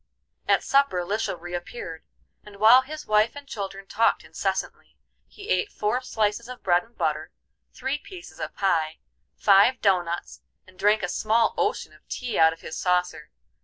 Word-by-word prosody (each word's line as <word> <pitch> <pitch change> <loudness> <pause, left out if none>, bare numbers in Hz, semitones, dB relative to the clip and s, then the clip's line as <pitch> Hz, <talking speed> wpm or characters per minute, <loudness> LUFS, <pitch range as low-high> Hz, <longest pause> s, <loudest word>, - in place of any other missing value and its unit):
At - - +3
supper 275 -10 +2
Lisha 205 -2 -2
reappeared, 175 -1 -7 0.4
and 210 -1 -13
while 225 +5 +7
his 305 +3 -8
wife 215 +3 +2
and 285 -1 -10
children 195 -4 -6
talked 225 +4 +1
incessantly, - - -4 0.3
he 405 +1 -12
ate 425 -3 +1
four 215 +5 -1
slices 225 -1 -1
of 250 - -9
bread 175 -1 +3
and 235 +1 -25
butter, 155 -2 -1 0.4
three 265 +3 -3
pieces 360 +2 -12
of - - -5
pie, 165 -5 0 0.4
five 205 +5 +5
dough 190 -3 +3
nuts, 170 0 -6 0.2
and 185 0 -20
drank 210 0 +3
a - - 0
small 220 +4 +1
ocean 425 +3 -1
of - - -22
tea 245 -4 -3
out 160 0 +6
of 165 - -10
his 155 - -7
saucer. 180 -4 -1
210 Hz, 165 wpm, -25 LUFS, 180-250 Hz, 0.4 s, while